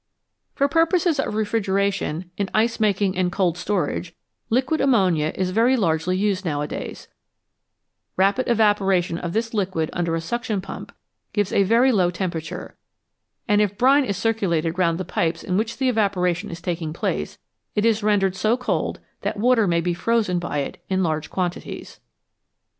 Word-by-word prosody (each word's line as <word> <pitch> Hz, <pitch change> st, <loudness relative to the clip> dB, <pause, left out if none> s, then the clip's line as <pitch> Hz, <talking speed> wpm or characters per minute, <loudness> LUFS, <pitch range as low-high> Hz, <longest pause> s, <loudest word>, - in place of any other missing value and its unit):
For 280 Hz, -, +2 dB
purposes 330 Hz, 0 st, +2 dB
of 240 Hz, -, -1 dB
refrigeration, 200 Hz, -5 st, -1 dB
in 200 Hz, -2 st, -2 dB
ice 225 Hz, +2 st, +2 dB
making 200 Hz, -3 st, +1 dB
and 180 Hz, -1 st, +1 dB
cold 185 Hz, -3 st, +1 dB
storage, 180 Hz, -2 st, -2 dB, 0.3 s
liquid 260 Hz, +6 st, +1 dB
ammonia 185 Hz, -, +3 dB
is 185 Hz, -1 st, -1 dB
very 235 Hz, +6 st, +3 dB
largely 175 Hz, -2 st, +1 dB
used 200 Hz, -1 st, 0 dB
nowadays; 150 Hz, -4 st, -4 dB, 1.1 s
rapid 200 Hz, +7 st, +2 dB
evaporation 195 Hz, -6 st, +2 dB
of 170 Hz, -1 st, -4 dB
this 225 Hz, +1 st, -1 dB
liquid 185 Hz, -6 st, -1 dB
under 170 Hz, -1 st, -1 dB
a -, -, -1 dB
suction 225 Hz, +3 st, -2 dB
pump 190 Hz, -, -8 dB, 0.4 s
gives 205 Hz, -2 st, 0 dB
a -, -, +4 dB
very 230 Hz, +7 st, +4 dB
low 185 Hz, -6 st, +3 dB
temperature, 170 Hz, -2 st, -5 dB, 0.7 s
and 210 Hz, -1 st, +4 dB
if 205 Hz, -1 st, 0 dB
brine 275 Hz, +3 st, +5 dB
is 200 Hz, -7 st, -2 dB
circulated 180 Hz, -7 st, 0 dB
round 170 Hz, -2 st, +2 dB
the 185 Hz, -, -4 dB
pipes 165 Hz, -1 st, -1 dB
in 180 Hz, -, -2 dB
which 220 Hz, +3 st, -1 dB
the 265 Hz, -, +1 dB
evaporation 200 Hz, -4 st, +1 dB
is 170 Hz, +1 st, -7 dB
taking 165 Hz, -3 st, -3 dB
place, -, -, -3 dB, 0.4 s
it 210 Hz, 0 st, +2 dB
is 225 Hz, -1 st, +3 dB
rendered 200 Hz, -3 st, +2 dB
so 215 Hz, +5 st, +1 dB
cold 255 Hz, 0 st, -2 dB, 0.2 s
that 215 Hz, -, -2 dB
water 230 Hz, -1 st, +3 dB
may 170 Hz, -1 st, +2 dB
be 175 Hz, +1 st, 0 dB
frozen 210 Hz, -1 st, +1 dB
by 150 Hz, -4 st, -2 dB
it 140 Hz, -, -7 dB
in 190 Hz, 0 st, +1 dB
large 155 Hz, -2 st, -1 dB
quantities. 180 Hz, -2 st, -4 dB
195 Hz, 160 wpm, -23 LUFS, 175-225 Hz, 1.1 s, brine